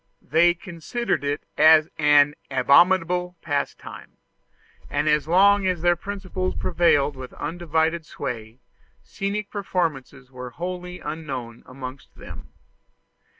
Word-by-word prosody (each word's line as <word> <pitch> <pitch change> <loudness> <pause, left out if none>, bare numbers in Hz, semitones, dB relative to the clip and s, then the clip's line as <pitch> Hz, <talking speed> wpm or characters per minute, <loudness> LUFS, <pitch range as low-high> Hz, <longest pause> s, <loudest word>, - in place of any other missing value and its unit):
They 170 +3 +3
considered 180 +5 -3
it 145 +1 -2 0.2
as 155 0 +7
an 145 -1 +5 0.2
abominable 180 +6 +3
pastime; 145 -4 -5 0.7
and 145 +1 -1
as 150 0 +2
long 195 +3 +4
as 180 -3 -1
their 175 0 +4
principles 185 0 -4
prevailed 145 -5 +2
with 130 -1 -9
undivided 160 0 -1
sway, 115 -2 -6 0.4
scenic 200 - -4
performances 155 - -3
were 125 -1 -8
wholly 180 +4 -6
unknown 135 -7 -6
amongst 130 +1 -9
them. - - -11
160 Hz, 105 wpm, -23 LUFS, 140-180 Hz, 0.7 s, as